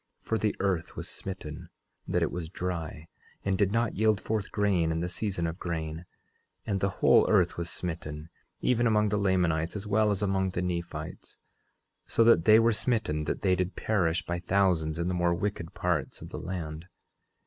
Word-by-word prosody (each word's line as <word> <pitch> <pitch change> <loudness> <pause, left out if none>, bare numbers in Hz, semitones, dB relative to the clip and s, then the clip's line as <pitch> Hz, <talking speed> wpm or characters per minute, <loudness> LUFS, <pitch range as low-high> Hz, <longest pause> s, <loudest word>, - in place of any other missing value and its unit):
For 115 - -1
the 105 - 0
earth 95 -4 -1
was - - -5
smitten 95 -6 -6 0.4
that - - +1
it - - 0
was 85 -2 -4
dry, 85 -4 -4 0.4
and 95 -1 +2
did 100 0 +2
not 115 0 +1
yield 110 -1 +2
forth 105 -1 -2
grain 95 -6 +2
in 80 - -1
the 85 - -1
season 90 -1 -2
of 80 +3 -4
grain; 80 -1 -4 0.6
and 100 -2 0
the 100 - +1
whole - - +4
earth - - +3
was 85 0 -4
smitten, 80 -3 -5 0.3
even 120 -1 +2
among 105 -1 +3
the 105 0 +1
Lamanites 90 -4 +1
as 100 0 -4
well 105 +1 +3
as 105 0 0
among 95 -1 +1
the 90 - -2
Nephites, 85 -1 -5 0.7
so 115 - +3
that 115 -8 +5
they 110 0 +8
were 115 0 +4
smitten 105 -10 0
that - - -2
they 95 -2 +3
did 90 +1 -2
perish 90 -5 0
by 85 0 -2
thousands 90 -4 +1
in 85 +1 -1
the 90 - 0
more 85 -1 +2
wicked 95 -3 -3
parts - - -1
of - - -9
the - - -6
land. 85 -2 -5
90 Hz, 190 wpm, -29 LUFS, 85-105 Hz, 0.7 s, they